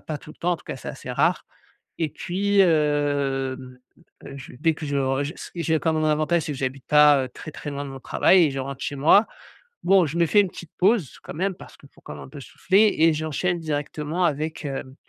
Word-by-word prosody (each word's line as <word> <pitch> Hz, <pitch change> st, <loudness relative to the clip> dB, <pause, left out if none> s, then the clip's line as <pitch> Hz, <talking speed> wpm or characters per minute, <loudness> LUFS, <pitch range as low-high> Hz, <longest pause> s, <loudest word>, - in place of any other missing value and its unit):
pas 155 Hz, -2 st, -6 dB
tout 155 Hz, -, -13 dB
le -, -, -15 dB
temps, 175 Hz, -, 0 dB
en -, -, -1 dB
tout -, -, -20 dB
cas, -, -, -5 dB
c'est -, -, -8 dB
assez -, -, -9 dB
rare. -, -, +1 dB, 0.5 s
Et 160 Hz, -2 st, 0 dB
puis, 200 Hz, +6 st, -2 dB
hem, 140 Hz, -5 st, 0 dB, 0.5 s
e 140 Hz, -, -9 dB
je 130 Hz, -, -10 dB
dès 160 Hz, -1 st, +2 dB
que 155 Hz, -, -8 dB
je 140 Hz, 0 st, -2 dB
re 135 Hz, 0 st, 0 dB
ist 145 Hz, +5 st, -7 dB
j'ai 160 Hz, -2 st, 0 dB
quand 160 Hz, 0 st, 0 dB
même 155 Hz, -, 0 dB
un 155 Hz, -, +3 dB
avantage, 155 Hz, +2 st, +1 dB
c'est 150 Hz, -, -4 dB
que 135 Hz, -, -7 dB
j'habite 130 Hz, 0 st, -4 dB
pas 150 Hz, -3 st, +5 dB
très, 155 Hz, +5 st, -10 dB
très, 145 Hz, -, -7 dB
loin 140 Hz, 0 st, -5 dB
de 140 Hz, -, -7 dB
mon 135 Hz, -, -9 dB
travail 180 Hz, +8 st, +4 dB
et -, -, -1 dB
je 135 Hz, -, -5 dB
rentre 135 Hz, 0 st, -5 dB
chez 145 Hz, -2 st, -3 dB
moi. 180 Hz, +10 st, +5 dB, 0.6 s
Bon, 190 Hz, -1 st, +5 dB
je 155 Hz, +3 st, -4 dB
me 170 Hz, -, +4 dB
fais 205 Hz, -, +4 dB
une 195 Hz, -, -1 dB
petite 170 Hz, -2 st, -11 dB
pause, 190 Hz, -, +1 dB
quand -, -, -8 dB
même, 190 Hz, +3 st, -2 dB
parce -, -, -14 dB
qu'il 140 Hz, -, -18 dB
faut -, -, -23 dB
quand -, -, -9 dB
même -, -, -9 dB
un -, -, -12 dB
peu 145 Hz, 0 st, -10 dB
souffler 200 Hz, +9 st, +2 dB
et 165 Hz, 0 st, +5 dB
j'enchaîne 155 Hz, +3 st, -2 dB
directement 150 Hz, +2 st, -3 dB
avec, 155 Hz, 0 st, -2 dB
hem 135 Hz, -1 st, -5 dB
150 Hz, 245 wpm, -24 LUFS, 140-170 Hz, 0.6 s, pas